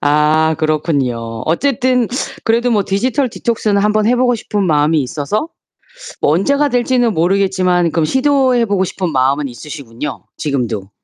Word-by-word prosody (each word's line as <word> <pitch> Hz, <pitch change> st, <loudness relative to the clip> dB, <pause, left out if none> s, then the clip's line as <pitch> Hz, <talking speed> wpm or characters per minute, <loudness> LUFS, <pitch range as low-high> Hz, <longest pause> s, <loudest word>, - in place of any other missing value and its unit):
아 150 Hz, +2 st, +2 dB
그렇군요. 135 Hz, -8 st, -1 dB
어쨌든 250 Hz, -, +1 dB, 0.4 s
그래도 235 Hz, +2 st, +1 dB
뭐 210 Hz, -4 st, +2 dB
디지털 250 Hz, +8 st, 0 dB
디톡스는 215 Hz, -3 st, -1 dB
한번 210 Hz, 0 st, +2 dB
해보고 245 Hz, +1 st, +2 dB
싶은 210 Hz, -3 st, -2 dB
마음이 150 Hz, 0 st, +2 dB
있어서 150 Hz, -, -3 dB, 0.7 s
뭐 -, -, +3 dB
언제가 280 Hz, -, +1 dB
될지는 245 Hz, -1 st, +1 dB
모르겠지만 185 Hz, -1 st, +1 dB
그럼 165 Hz, -1 st, +1 dB
시도해 260 Hz, -, +2 dB
보고 200 Hz, -3 st, 0 dB
싶은 185 Hz, -1 st, -3 dB
마음은 135 Hz, +2 st, +1 dB
있으시군요 135 Hz, 0 st, -7 dB
지금도. 120 Hz, -9 st, -3 dB
185 Hz, 350 characters per minute, -16 LUFS, 150-235 Hz, 0.7 s, 뭐